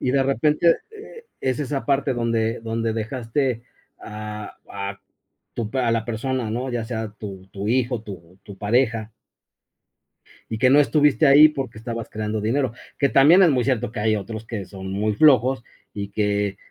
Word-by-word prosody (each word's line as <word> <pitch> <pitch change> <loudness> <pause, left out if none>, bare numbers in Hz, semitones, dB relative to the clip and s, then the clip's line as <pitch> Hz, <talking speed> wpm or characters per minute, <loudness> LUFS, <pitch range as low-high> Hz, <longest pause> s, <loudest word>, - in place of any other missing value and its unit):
Y 125 - 0
de 135 0 +3
repente, 150 +4 +3
eh, 450 +2 -12
es 130 0 -1
esa 140 -1 -3
parte 140 -1 +1
donde 115 -1 0
donde 115 0 -2
dejaste 115 +2 -2 0.4
a 105 0 -7
a 100 0 -5 0.5
tu 115 -3 -3
pa 130 0 0
a - - +2
la 115 -1 0
persona, 120 0 -2
¿no?, 125 +4 -3
ya 120 -2 -2
sea, 110 -2 -4
tu 95 -3 -8
tu 100 +1 -6
hijo, 120 0 0
tu 95 -3 -11
tu 100 -2 -11
pareja. 115 +1 0 1.4
Y 110 - -2
que 125 +3 +4
no 140 +3 +6
estuviste 150 0 +3
ahí 145 +3 +9
porque 135 -6 -5
estabas 115 0 -6
creando 110 0 -3
dinero, 125 +3 0 0.2
que 140 - +2
también 160 +8 +6
es 175 - +6
muy 125 -3 +1
cierto 125 -2 0
que 115 - -5
hay 110 0 +2
otros 110 +2 -6
que 110 -4 -5
son 95 0 -8
muy 105 +2 0
flojos 130 -1 +4 0.3
y 100 -1 -5
que 100 -1 -1
115 Hz, 175 wpm, -23 LUFS, 105-135 Hz, 1.4 s, ahí